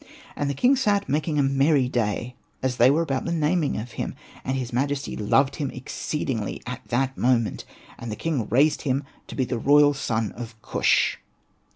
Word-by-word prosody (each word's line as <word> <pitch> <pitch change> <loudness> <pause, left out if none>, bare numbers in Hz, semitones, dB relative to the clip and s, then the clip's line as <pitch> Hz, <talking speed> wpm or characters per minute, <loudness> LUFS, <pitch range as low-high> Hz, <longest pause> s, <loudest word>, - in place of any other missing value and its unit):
And 145 - -1
the 140 - -2
king 250 - +4
sat 205 -6 +1
making 150 +1 0
a 145 - +4
merry 135 0 +3
day, 120 0 -1 0.3
as 130 -2 0
they 120 +2 +6
were 155 +5 +3
about 135 -5 -2
the 170 - -2
naming 160 -1 +1
of 115 +3 -5
him, - - -4 0.3
and 130 +1 -1
his 125 -2 -4
majesty 140 +3 -1
loved 135 +6 +2
him 145 -3 -2
exceedingly 125 -3 -3
at 125 +1 -6
that 135 +2 0
moment, 120 -3 +1 0.3
and 120 -1 -6
the - - -3
king 140 -8 -2
raised 140 +7 +3
him 135 -1 0 0.2
to - - -8
be 130 - +1
the 120 -1 -3
royal 145 +3 +5
son 115 -6 -1
of 115 -2 -9
Kush. - - +2
135 Hz, 190 wpm, -25 LUFS, 120-145 Hz, 0.3 s, they